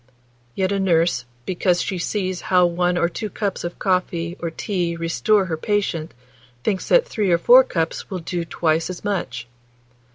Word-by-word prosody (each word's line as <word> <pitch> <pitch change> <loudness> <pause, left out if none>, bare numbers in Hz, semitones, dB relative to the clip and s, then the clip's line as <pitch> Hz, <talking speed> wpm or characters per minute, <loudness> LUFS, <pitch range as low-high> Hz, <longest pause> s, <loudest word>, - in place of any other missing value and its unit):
Yet 190 0 0
a 200 - 0
nurse, 165 -8 +2 0.2
because 180 -1 +1
she 185 - -3
sees 185 0 -2
how 180 -1 +3
one 175 +1 +1
or 170 - +3
two 210 +5 -5
cups 200 0 -3
of 175 0 -3 0.4
tea 170 0 -4
or 170 - -3
coffee 175 0 -2
restore 180 +5 +1
her 165 -3 -3
patient, 170 -5 -1 0.5
thinks 195 -3 -1
that - - +5
three 210 - -1
or 170 - +4
four 245 +9 +7
cups 165 -8 -3
will 190 - -3
do 175 0 -3
twice 165 0 0
as 185 - -7
much. 190 - -3
180 Hz, 170 wpm, -22 LUFS, 170-195 Hz, 0.5 s, four